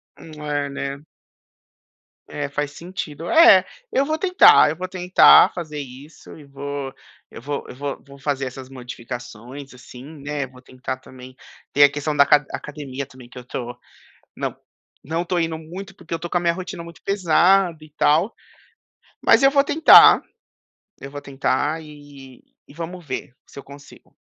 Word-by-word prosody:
Hum, 165 - -14
é, 145 -1 -2
né. 140 0 -5 1.3
É, 145 -1 -4
faz 145 0 -3
sentido. 165 -1 -7
É, 335 +2 +7 0.3
eu 270 - +1
vou 310 +2 -1
tentar, 365 - +6
eu - - -5
vou 185 +3 -5
tentar 180 0 +6
fazer 155 -4 -6
isso 140 +3 -11
e 155 - -13
vou 140 -1 -6 0.4
eu - - -11
vou 145 +3 -5
eu - - -10
vou 140 +1 -6
vou 140 0 -15
fazer 135 -1 -2
essas 130 0 -8
modificações, 125 +1 -9
assim, 125 0 -13
né. 145 -1 -5
Vou 130 -1 -16
tentar 130 0 -6
também 130 0 -14 0.4
ter 145 - +5
a 145 - +7
questão 145 +1 -3
da 140 - +6
aca 145 0 +3
academia 140 -2 -6
também 130 -2 -16
que 125 - -11
eu 125 - -13
tô 120 -1 -6 0.6
não - - -4 0.5
não 165 +4 -2
estou 175 0 -1
indo 165 -1 -2
muito 185 +5 -9
porque 185 - -7
eu - - 0
estou 170 +1 -7
com 175 - +1
a - - -4
minha 170 -1 +1
rotina 180 -1 -7
muito 170 -1 -14
pesada 185 -1 +3
e 155 - -17
tal, 155 +7 +2 0.9
mas - - +5
eu 275 - +6
vou 280 0 +4
tentar, 310 +3 +7 0.8
eu 135 - -9
vou 145 0 -8
tentar 145 +3 -2
e 145 -4 -14 0.2
e - - -16
vamos 170 +2 -7
ver 130 -3 -6
se - - -14
eu - - -8
consigo. 140 +1 -16
145 Hz, 175 wpm, -21 LUFS, 135-170 Hz, 1.3 s, É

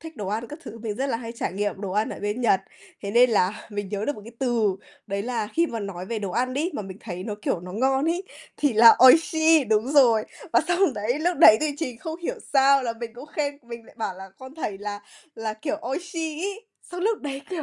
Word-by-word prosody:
thích 325 -2 -10
đồ 200 -4 -5
ăn 225 +3 -2
các 295 - -8
thứ, 230 - -9
mình 220 -2 -4
rất 270 - -1
là 265 - -1
hay 230 0 -7
trải 230 - -3
nghiệm 205 0 -2
đồ 200 -2 -4
ăn 215 +2 +1
ở - - -6
bên 205 +4 -2
Nhật, 205 -5 +3 0.4
thế 200 - -4
nên 245 +2 +5
là 200 -2 0
mình 205 -1 -4
nhớ 205 +1 -3
được 290 - -1
một 210 - -11
cái 230 - -11
từ. 230 -7 +1 0.3
Đấy 200 0 -3
là 230 -2 -2
khi 335 +1 +3
mà 230 -7 -5
nói 190 -2 -6
về 230 0 -3
đồ 200 -2 -4
ăn 255 +6 -1
đó, 320 +6 -1
mà 210 - -3
mình 190 0 -9
thấy 180 -4 -6
nó, 210 -1 -4
kiểu, 170 - -1
nó 180 0 -9
ngon 265 +6 +1
ấy, 345 +3 0 0.3
thì 290 -3 +1
là 230 +1 +8
oishii, 320 +1 +5
đúng 220 0 +1
rồi. 235 -7 +5 0.3
Và - - +5
xong 350 -5 +2
đấy 225 +7 -1
lúc 345 +2 0
đấy 215 0 +9
thì 305 -1 +1
trình 255 -8 -4
không 320 +4 -6
hiểu - - -2 0.2
sao 275 -1 +5
là 230 -2 -1
mình 235 -1 -5
cũng 255 +5 -10
khen, 290 -1 -3
mình 235 -1 -9
lại - - -18
bảo 205 -4 -2
là 190 +1 -10
con 260 +2 -11
thầy 210 -11 -4
là 205 0 -5 0.3
là, 220 -1 -4
kiểu, 295 +7 -3
oishii, 325 +2 -4
ấy. 405 +3 -4 0.3
Xong 355 - -5
lúc 435 +3 +1
đấy, 275 -2 -5
kiểu 345 -4 -3
235 Hz, 260 wpm, -25 LUFS, 210-295 Hz, 0.4 s, đấy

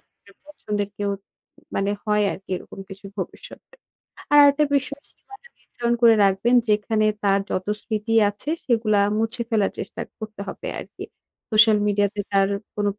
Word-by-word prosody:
যদি - - -45 0.2
এর - - -18
পছন্দের 210 -9 -4
কেউ 205 -1 -1 0.6
মানে 195 +1 0
হয় 210 -1 +2
আরকি 195 - -11
এরকম 195 - -11
কিছু 195 +1 -11
ভবিষ্যতে। 185 - -8 0.6
আর - - +7
আরেকটা 285 +1 +5
বিষয় 280 +1 -3
সীমানা 415 +4 -17
নির্ধারণ 240 0 -2
করে 230 -1 +7
রাখবেন, 195 +6 +2
যেখানে 215 +1 +2 0.2
তার 195 0 +3
যত 185 +1 -2 0.2
স্মৃতি 220 +1 -2 0.2
আছে 205 +8 -6
সেগুলা 220 -4 +2 0.2
মুছে 225 +2 -1
ফেলার 210 -4 +1
চেষ্টা - - -6 0.2
করতে 215 -1 -8
হবে - - -7
আরকি। - - -9 0.5
সোশ্যাল 215 -1 +6
মিডিয়াতে 205 0 0
তার 195 0 +3 0.3
কোন 205 0 0
215 Hz, 150 wpm, -23 LUFS, 200-235 Hz, 0.6 s, আর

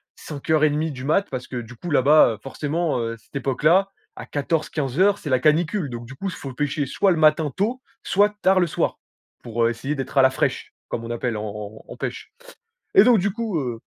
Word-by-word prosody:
5:30 155 +1 0
du 130 -1 -8
mat 195 +7 +2
parce 130 -1 -5
que 125 - -6
du 120 +1 -7
coup 175 +9 -7
là-bas, 145 -3 +5
heu, - - -15
forcément, 150 +2 -2
heu, 115 0 -3
cette 110 - -24
époque 135 +1 -2
là 190 +5 +5 0.3
à - - -7
14-15:00 155 +5 0
c'est 150 - -7
la 130 - +3
canicule. 155 +2 +1
Donc 120 0 -7
du 130 - -10
coup 195 +9 -5
il - - -2
faut 135 -5 -7
pêcher 145 +1 -1
soit 195 +8 +2
le 170 - +1
matin 155 -1 +3
tôt, 235 +7 -1 0.2
soit 205 +1 +2
tard 190 0 +5
le 175 - +2
soir. - - -1 0.4
Pour, 115 -1 -2
heu, - - +3
essayer 135 +5 -3
d'être 135 +1 -5
à - - +8
la 130 - +7
fraîche, - - -2
comme 115 - -4
on 115 - -7
appelle 120 -1 -2
en 105 - -4
en 105 +1 -7
en - - -7
en - - -14
pêche. - - -5 0.6
Et 390 - +9
donc 245 -3 +5
du 195 +1 0
coup, 225 -7 -2
heu 120 -4 -3
150 Hz, 230 wpm, -23 LUFS, 125-175 Hz, 0.6 s, Et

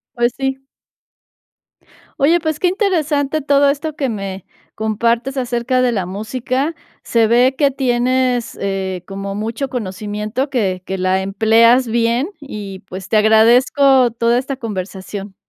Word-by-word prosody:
Pues 240 0 +1
sí. 265 0 -2 1.6
Oye, 325 +5 +3
pues, 315 -2 -2
qué 365 - +3
interesante 315 -7 0
todo 280 0 +3
esto 300 +2 -3
que 275 -3 -1
me 195 -4 -5 0.3
compartes 230 +4 -1
acerca 250 0 0
de 250 -1 +2
la 195 -5 -1
música. 255 - -3 0.3
Se 230 -1 +2
ve 245 +4 +3
que 285 -1 +3
tienes, 255 -2 0
eh, 190 -2 -3
como 195 0 -5
mucho 225 +6 -3
conocimiento, 210 +3 -4
que 195 -8 -1
que 190 +1 -4
la 185 +1 +1
empleas 225 +5 +4
bien, 235 +5 +1
y 205 -9 -8
pues 190 +1 -8
te 220 - +1
agradezco 245 +4 +5
toda 235 +1 +1
esta 270 +2 -4
conversación. 195 -3 -6
235 Hz, 135 wpm, -18 LUFS, 205-270 Hz, 1.6 s, agradezco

